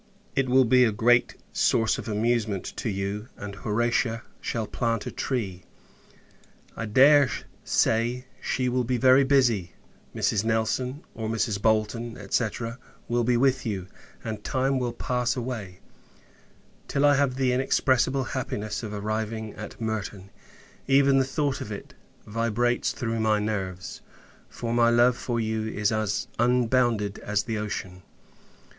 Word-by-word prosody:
It 135 -2 +1
will 130 +1 +5
be 125 +2 +5
a 115 - +3
great 120 +3 +3 0.2
source 115 -1 +2
of - - -7
amusement 110 -2 0
to 115 - -2
you; 100 +2 -3
and 100 0 -7
Horatia 115 +2 0 0.2
shall 115 -2 -2
plant 115 -1 -1
a - - -4
tree. 100 -9 -3 1.1
I 115 - -4
dare 140 +5 +6 0.3
say, 120 +3 +1 0.2
she 130 -1 -1
will 125 0 +1
be 125 +1 0
very 130 +2 +6
busy. 120 -11 +2 0.4
Mrs. 105 -1 +1
Nelson, 115 +5 -1
or 110 -1 -4
Mrs. 110 -2 -1
Bolton, 115 +2 0
&c. 120 - +3 0.6
will 120 0 +1
be 120 +1 +2
with 130 0 +2
you; 100 -5 -3 0.4
and 110 -2 -5
time 135 +1 0
will 125 -1 -1
pass 125 +1 -1
away, 115 -7 -5 1.1
till 140 +1 +1
I 145 - +6
have 140 -2 +2
the 130 -1 +1
inexpressible 130 +1 +2
happiness 120 -5 -3
of 110 -3 -6
arriving 110 +1 -3
at 105 - -9
Merton. 105 -3 -4 0.6
Even 135 0 +5
the 135 - +2
thought 140 0 -1
of 105 - -6
it 100 - -8 0.3
vibrates 115 +2 0
through 115 -3 -3
my 110 -1 +3
nerves; 95 -4 -4 0.5
for, 115 -1 -4
my 120 0 +4
love 120 +1 +4
for 120 -1 -2
you 110 -1 -1
is 105 -1 0
as 110 -2 -1
unbounded 120 -3 +2
as 105 0 -1
the 110 -1 -3
ocean! 95 -3 -5
115 Hz, 145 wpm, -26 LUFS, 105-125 Hz, 1.1 s, dare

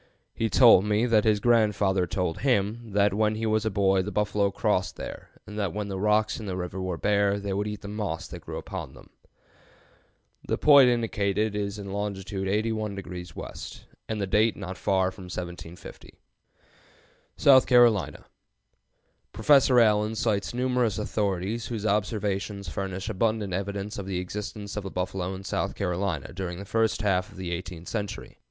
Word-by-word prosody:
He 115 - -1
told 115 -7 +7
me 105 +2 +1
that 115 -3 +3
his 105 -2 +3
grandfather 105 -5 +2
told 90 -2 -2
him 115 -3 0
that 100 0 +3
when 105 +1 +1
he 110 +1 -3
was 110 0 +1
a - - +2
boy 95 -2 +2
the 100 +3 -4
buffalo 105 -1 +1
crossed 100 -2 0
there, - - -8 0.2
and 105 +1 -7
that 100 -5 -1
when 105 -1 -3
the 95 -1 -4
rocks 105 +2 +2
in 110 - -7
the 95 -1 -3
river 90 +1 -4
were 90 -2 -3
bare 100 +1 +2
they 100 -1 -3
would 100 +2 -1
eat 105 -1 -5
the 100 - -8
moss 100 -6 -4
that - - -8
grew - - -7
upon - - -7
them." - - -16 1.4
The - - 0
point 140 -4 +7
indicated 105 -3 0
is 100 0 -2
in 100 -1 -7
longitude 95 -1 -3
81° 100 -5 -3
west - - -8 0.2
and 110 - -2
the 100 - 0
date 105 +3 +2
not 95 -2 -6
far 95 0 +1
from 95 -1 -11
1750. 90 -1 -8 1.2
SOUTH 130 -2 +6
CAROLINA. 120 -6 +4 1.1
Professor 130 +2 +5
Allen 105 -1 +3
cites 105 -2 0
numerous 125 -4 0
authorities, 105 +1 -2
whose 110 -3 -4
observations 105 -1 -1
furnish 95 +3 -4
abundant 110 -2 -1
evidence 100 +3 -3
of 95 - -6
the 95 -2 -2
existence 100 +2 -5
of 105 - -2
the 95 - -5
buffalo 90 0 -3
in 95 - -9
South - - -2
Carolina 90 -5 -2
during 90 -1 -4
the 100 - -7
first 110 +1 0
half 95 -2 +1
of 100 - -15
the 90 -2 -4
eighteenth 85 -1 -6
century. 105 -1 -5
100 Hz, 170 wpm, -27 LUFS, 95-110 Hz, 1.4 s, told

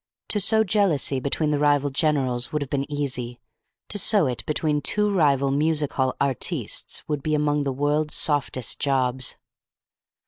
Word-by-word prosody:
To 210 - +1
sow 220 +3 +3
jealousy 185 -10 +1
between 150 +3 -1
the 145 - 0
rival 145 -1 +2
generals 135 -4 0
would 150 -1 -1
have 135 - -12
been 140 +1 -2
easy. 125 -4 -4 0.5
To 205 - 0
sow 205 -4 +4
it 125 -3 -3
between 150 -1 0
two 210 +6 +2
rival 140 -6 +2
music 150 0 0
hall 130 -1 0
artistes 135 -4 -1
would 150 -2 -2
be 155 +2 -1
among 150 -1 0
the 135 - -1
world's 145 +3 -1
softest 145 -5 +1
jobs. 130 -2 0
145 Hz, 160 wpm, -23 LUFS, 135-155 Hz, 0.5 s, sow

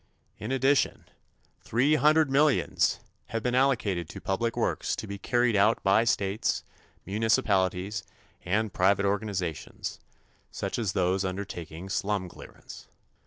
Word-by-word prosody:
In 110 +4 -5
addition, 135 +1 +2 0.6
three 130 +7 +2
hundred 155 -1 +4
millions 145 +1 +2 0.3
have 115 -1 -3
been 125 - 0
allocated 110 - +1
to - - -8
public 115 +5 -2
works - - 0
to - - -6
be 100 -1 -7
carried 120 +1 +1
out 105 +3 +3
by 100 +4 +4
states, 100 -2 0 0.4
municipalities 100 -2 +1 0.4
and 105 +3 0
private 100 +2 +3
organizations, 100 -5 -3 0.5
such - - -4
as 105 -5 -1
those 95 +1 +1
undertaking 95 -3 -5
slum 95 -1 -1
clearance. - - -12
105 Hz, 120 wpm, -28 LUFS, 95-120 Hz, 0.6 s, hundred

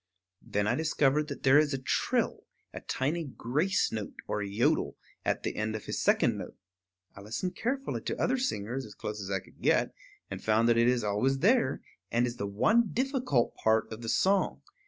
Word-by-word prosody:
Then 105 0 -1
I 105 - +2
discovered 150 0 +2
that 140 - -7
there 135 +2 +7
is 150 -2 +1
a - - -1
trill, 130 - -1 0.3
a - - -7
tiny 155 +6 -1
grace 150 +7 0
note 110 -2 -5
or 105 - -1
yodel, 100 +3 0 0.3
at - - -1
the - - -2
end 110 0 -2
of 110 - -6
his - - -3
second - - +3
note. - - -8 0.6
I 100 - -10
listened 115 - -4
carefully 270 +6 -2
to - - -4
other 260 +1 +1
singers, 130 - -2
as 105 -4 -11
close 105 0 -5
as 95 - -6
I 95 - +1
could - - -21
get, - - +2 0.4
and - - -6
found 110 +1 +3
that 115 - +4
it 115 - +4
is 125 -2 +2
always 105 +7 +1
there, 225 - +2 0.3
and 120 +1 +2
is 120 0 -4
the 100 - -3
one 220 - +3
difficult 255 - 0
part 110 0 +2
of 110 - -9
the 115 - -4
song. 195 - +2
125 Hz, 200 wpm, -30 LUFS, 110-170 Hz, 0.6 s, there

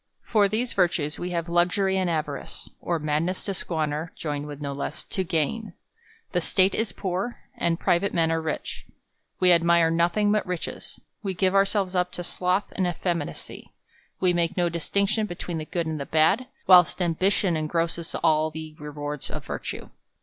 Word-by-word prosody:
For 210 -3 +3
these 230 +4 -1
virtues, 170 -5 +1
we 180 - -3
have 170 -1 -2
luxury 180 +3 +2
and 185 -2 +1
avarice; 150 -4 -4
or 170 - 0
madness 155 +4 -1
to 200 - -2
squander, 160 -2 -1
joined 145 -2 -4
with 145 -1 -7
no 140 -1 -3
less, 140 - -4
to 190 - -2
gain; 180 +4 -1 0.6
the - - +1
State 190 0 +3
is 220 -3 0
poor, 190 +5 -3 0.2
and 170 0 0
private 185 +3 +2
men 165 -1 +2
are 165 0 +1
rich. 160 -1 -4 0.5
We 180 -1 +5
ad 170 -1 +5
mire 170 -1 +4
nothing 175 +5 +2
but 210 -1 +2
riches; 180 -2 -5 0.2
we 195 -4 -3
give 185 +1 +2
ourselves 195 -1 +2
up 180 -1 +1
to 175 - -3
sloth 180 +3 -1
and 185 -2 +1
effeminacy; 175 -3 -4 0.5
we 180 -1 +3
make 170 +1 0
no 175 -1 +2
distinction 200 +6 0
between 175 -2 -4
the 155 - -5
good 170 +1 -2
and 160 -1 -3
the 140 - -5
bad; 160 +11 +3 0.2
whilst 180 -1 +7
ambition 180 +1 +2
engrosses 165 +2 -1
all 155 -1 +3
the 155 0 -8
re 150 0 -6
wards 145 -1 -4
of - - -6
virtue. - - -5
175 Hz, 180 wpm, -26 LUFS, 160-190 Hz, 0.6 s, whilst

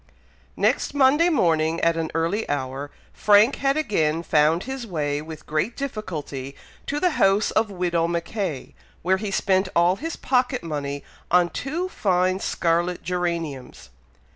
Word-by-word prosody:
Next - - +1
Monday 285 +5 +5
morning, 165 - +2
at 165 0 +3
an 165 -1 -2
early 170 +7 -1
hour, 140 0 -3 0.2
Frank 210 +4 +4
had 275 +1 +1
again 165 - 0
found 155 +2 +3
his 265 -2 -5
way 145 -5 -2
with 155 0 -10
great 155 +10 -1
difficulty 155 - -5 0.3
to 290 - -1
the 360 +1 +2
house 195 +2 +3
of 220 0 +1
Widow 175 -3 0
Mackay, 170 - -3 0.3
where 190 +2 +3
he 210 +1 -4
spent 190 -1 +1
all 175 +2 +4
his 325 +5 -4
pocket 250 -2 0
money 145 -3 -4 0.3
on 175 0 +4
two 325 +7 -3
fine 185 - +1
scarlet 170 0 0
geraniums. 165 - -4
180 Hz, 140 wpm, -24 LUFS, 160-215 Hz, 0.3 s, Monday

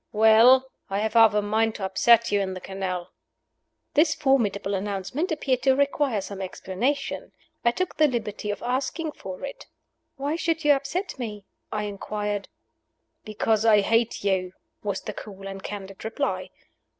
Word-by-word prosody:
"Well, 230 +5 +6 0.2
I 195 - -1
have 220 +1 -1
half 225 -2 +6
a 210 - +2
mind 220 +2 +1
to 195 - -3
upset 230 +4 +4
you 205 -1 +3
in 190 -1 -3
the - - -5
canal." 185 -2 -4 0.8
This 305 +1 +4
formidable 215 -8 +1
announcement 200 - -2
appeared 265 -5 0
to 265 0 +4
require 280 -5 +1
some 195 0 -7
explanation. 195 +9 -3 0.3
I 235 - +5
took 365 +8 -2
the 310 - +6
liberty 215 -5 -3
of 205 - -3
asking 265 +6 -1
for 190 -2 -7
it. 275 - -9 0.5
"Why 285 +2 -2
should 330 -1 -1
you 295 - +7
upset 285 +5 -3
me?" 210 -4 -5 0.3
I 210 0 -2
inquired. 205 0 -3 0.8
"Because 215 0 +1
I 215 -2 +6
hate 225 +2 +1
you," 190 -2 0 0.3
was 200 -2 -2
the - - -6
cool 195 -2 -9
and 195 0 -7
candid 195 -1 -7
reply. 225 +6 -2
220 Hz, 160 wpm, -25 LUFS, 200-265 Hz, 0.8 s, you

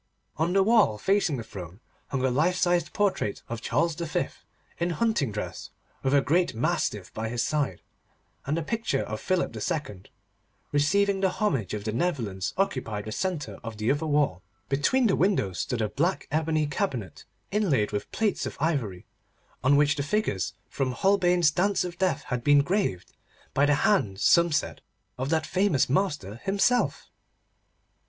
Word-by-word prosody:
On 165 +3 +1
the 195 0 +5
wall, 215 - +4
facing 190 - +1
the 115 - -5
throne, 95 -3 -9 0.3
hung 130 -1 -1
a 130 - +2
life 160 +8 +2
sized 175 -2 +1
portrait 195 - 0
of 115 -1 -5
Charles 165 +7 +1
V. 165 -1 -2 0.5
in 170 +1 0
hunting 175 - 0
dress, 105 - -5 0.3
with 135 +1 +2
a 140 - +5
great 170 +1 +1
mastiff 115 - -1
by 110 0 -3
his 120 0 -1
side, 145 - -1 0.6
and 150 +3 0
a 165 - -1
picture 225 - -1
of 110 0 -5
Philip 185 -10 0
II. 105 - -3 0.7
receiving 195 +7 +2
the 190 - +3
homage 135 - -1
of 105 - -5
the 110 - -2
Netherlands 110 - -2
occupied 120 - -1
the 110 - -5
centre 180 - -3
of 115 -2 -6
the 110 +3 +1
other 150 +3 -1
wall. 145 -11 +1 0.3
Between 145 - +2
the 195 - +3
windows 175 - +1
stood 115 -3 -1
a 105 - -1
black 170 - -1
ebony 155 0 +1
cabinet, 130 -7 -3 0.3
inlaid 170 - +1
with 105 - -4
plates 215 -3 0
of - - -7
ivory, 135 - -1 0.6
on 140 +3 +5
which 145 0 +3
the - - 0
figures 140 - -1
from 130 -2 -2
Holbein's 180 +1 +3
Dance 195 +5 +1
of 180 -1 -6
Death 185 -6 +1
had 125 -3 -3
been 145 +1 +5
graved—by 145 - -2
the 145 - +4
hand, 125 - +1
some 170 +8 +5
said, 145 - -1 0.4
of 130 +2 -2
that 160 0 +1
famous 185 -7 +2
master 145 - -1
himself. 200 - +1
145 Hz, 165 wpm, -27 LUFS, 115-185 Hz, 0.7 s, the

